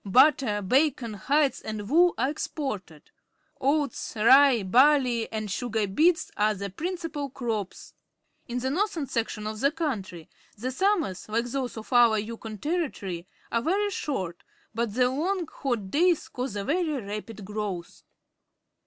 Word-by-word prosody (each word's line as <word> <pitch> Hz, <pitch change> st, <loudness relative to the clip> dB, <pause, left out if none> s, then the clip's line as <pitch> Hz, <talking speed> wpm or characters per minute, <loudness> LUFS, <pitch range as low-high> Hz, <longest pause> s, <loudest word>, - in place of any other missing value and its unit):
Butter, 245 Hz, -1 st, +4 dB
bacon, 260 Hz, +1 st, +2 dB
hides, 280 Hz, +7 st, +1 dB
and 215 Hz, -2 st, -5 dB
wool 345 Hz, +7 st, +4 dB
are 260 Hz, +4 st, +1 dB
exgorted. 215 Hz, -, -5 dB, 0.5 s
Oats, 280 Hz, -1 st, 0 dB
rye, 250 Hz, +1 st, +6 dB
barley^^ 250 Hz, +2 st, +4 dB
and 215 Hz, -2 st, -3 dB
sugar 220 Hz, 0 st, -1 dB
beets 320 Hz, -, +2 dB
are 210 Hz, 0 st, +2 dB
the 200 Hz, 0 st, -5 dB
principal 325 Hz, -, -4 dB
crops. 225 Hz, -7 st, -4 dB, 0.5 s
In 240 Hz, -, -3 dB
the 260 Hz, +2 st, -1 dB
north 395 Hz, +4 st, 0 dB
ern 300 Hz, -, -1 dB
section 225 Hz, -3 st, -3 dB
of 215 Hz, 0 st, -4 dB
the 275 Hz, -, +4 dB
country 225 Hz, -, -4 dB, 0.3 s
the 250 Hz, +5 st, -3 dB
summers, 335 Hz, -, 0 dB
like 230 Hz, +2 st, 0 dB
those 250 Hz, -1 st, -3 dB
of 220 Hz, +4 st, -7 dB
our 235 Hz, -3 st, +6 dB
Yukon 220 Hz, 0 st, -5 dB
Territory, 205 Hz, -, -3 dB, 0.2 s
are 230 Hz, -, +1 dB
very 405 Hz, -, +1 dB
short, 185 Hz, -, -3 dB, 0.3 s
but 230 Hz, -2 st, -2 dB
the 250 Hz, 0 st, +4 dB
long, 340 Hz, +8 st, -1 dB
hot 240 Hz, -11 st, -3 dB
days 335 Hz, 0 st, +2 dB
cause 255 Hz, -7 st, -4 dB
a 200 Hz, -, -2 dB
very 310 Hz, -, 0 dB
rapid 210 Hz, 0 st, -7 dB
growth. 205 Hz, -4 st, -5 dB
245 Hz, 145 wpm, -27 LUFS, 210-295 Hz, 0.5 s, rye